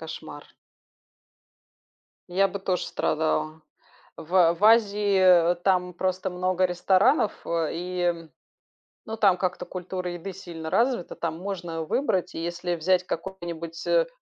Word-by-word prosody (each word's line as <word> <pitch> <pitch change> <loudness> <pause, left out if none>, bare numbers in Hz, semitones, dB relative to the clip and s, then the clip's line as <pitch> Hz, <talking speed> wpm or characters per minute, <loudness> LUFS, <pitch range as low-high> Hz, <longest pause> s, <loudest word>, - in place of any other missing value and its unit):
Кошмар. 160 -2 -9 1.8
Я 195 +2 +3
бы 200 - -5
тоже 185 -2 -1
страдала. 155 0 -1 0.6
В, 170 +4 -8
э, 170 -2 +6
в 190 - -15
Азии, 200 -6 +5
э, - - -2
там 180 -2 +1
просто 185 +1 -1
много 185 +1 +1
ресторанов, 190 - +3
э, 165 -2 0
и 180 +1 -4
м, 170 -2 -1 0.8
ну, 220 0 -5
там 195 -4 +4
как-то 180 -1 -2
культура 180 0 -5
еды 175 +3 -6
сильно 165 -4 -8
развита, 235 -4 0
там 165 -1 -3
можно 175 -3 -5
выбрать. 190 - -1
И 165 - -4
если 175 +1 -2
взять 180 +2 +1
какой-нибудь, 170 -2 -6
э, - - +3
180 Hz, 135 wpm, -26 LUFS, 170-190 Hz, 1.8 s, э